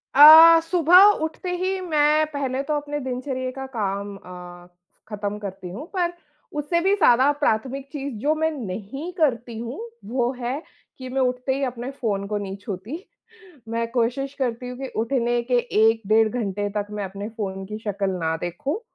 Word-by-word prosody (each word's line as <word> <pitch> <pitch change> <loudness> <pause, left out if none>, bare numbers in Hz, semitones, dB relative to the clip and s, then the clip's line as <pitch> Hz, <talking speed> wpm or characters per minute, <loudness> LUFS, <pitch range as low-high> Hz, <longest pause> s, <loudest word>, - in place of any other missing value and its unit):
अ, 320 +3 +10
सुबह 345 +2 +6 0.2
उठते 320 +3 -4
ही 375 +1 -1
मैं 305 -3 +3
पहले 270 -2 -2
तो 300 - -2
अपने 295 0 -4
दिनचर्या 255 0 -4
का 265 - -4
काम 200 -1 -2
अ, 180 -1 -11 0.4
ख़त्म 210 -1 -4
करती 190 -3 -7
हूँ, 220 - -7
पर 350 -2 0 0.5
उससे 320 +4 0
भी 385 +3 +3
ज़्यादा 270 -7 +5
प्राथमिक 265 +2 0
चीज़ 280 -2 -5
जो 295 +4 +2
मैं 315 +1 +1
नहीं 245 - -6
करती 240 -7 0
हूँ, 235 +5 -6 0.3
वो 240 +2 0
है 255 +4 -3 0.4
कि 255 -1 -8
मैं 265 +1 -1
उठते 250 +1 0
ही 275 - -2
अपने 250 0 -4
फ़ोन 210 -7 -2
को 210 0 -2
नहीं 195 -1 -5
छूती। 205 - -6 0.7
मैं 230 0 -1
कोशिश 250 +3 -1
करती 250 -1 -2
हूँ 250 - -7
कि 270 - -4
उठने 240 0 0
के 245 +1 +1 0.2
1 225 +1 +4
डेढ़ 220 +1 +4
घंटे 205 -3 -2
तक 205 0 -2
मैं 210 -1 -4
अपने 200 +2 -6
फ़ोन 195 -4 -5
की 210 +2 -6
शक्ल 200 -2 -2
ना 165 -3 -1
देखूँ 175 - -3
250 Hz, 175 wpm, -23 LUFS, 210-290 Hz, 0.7 s, अ